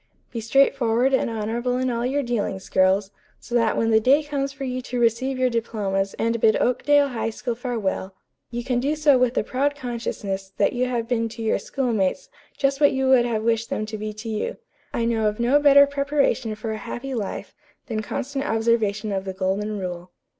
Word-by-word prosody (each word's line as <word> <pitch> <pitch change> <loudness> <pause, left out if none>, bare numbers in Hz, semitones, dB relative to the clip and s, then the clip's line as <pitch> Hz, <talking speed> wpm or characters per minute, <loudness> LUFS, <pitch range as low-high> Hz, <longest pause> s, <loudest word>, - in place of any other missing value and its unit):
Be 230 - -4
straightforward 255 0 +2
and 265 - +2
honorable 230 +3 -2
in 255 0 0
all 235 +1 -1
your 280 +2 0
dealings, 210 -6 -2
girls; 190 +1 +2 0.3
so - - -11
that 230 -2 +2
when 225 0 +1
the 220 - +6
day 275 +7 +4
comes 280 -2 -2
for 275 0 -8
you 255 -1 -3
to 250 0 -4
receive 240 +3 +1
your 255 -1 +2
diplomas 200 -4 -1
and 230 0 0
bid 220 -1 +5
Oakdale 280 +3 +3
High 230 -3 -2
School 240 +2 -4
farewell, 225 -6 -3 0.3
you 240 0 -4
can 250 -1 0
do 285 +5 0
so 295 -4 +4
with 250 0 +2
the - - +1
proud 285 +3 0
consciousness 205 -7 -4
that 200 - +2
you 250 +1 0
have 235 -2 -2
been 230 -2 0
to 225 0 -7
your 220 - +1
schoolmates 235 - -1 0.3
just 275 +1 0
what 285 - +5
you 265 0 +1
would 255 -2 +5
have 220 -3 -1
wished 230 0 0
them 215 - -2
to 215 0 -6
be 215 0 -4
to 215 +2 -9
you. 215 -1 -3 0.3
I 230 - -1
know 225 -2 +1
of 210 +1 -2
no 250 +5 +4
better 285 -1 +7
preparation 280 -5 0
for 220 +1 -5
a 220 - -3
happy 265 +5 -6
life 215 -5 -4 0.3
than 220 -2 -3
constant 275 +5 -4
observation 225 -3 +1
of 190 -1 -1
the 190 - -4
golden 195 +3 -2
rule. 180 -2 -5
235 Hz, 205 wpm, -23 LUFS, 215-260 Hz, 0.3 s, better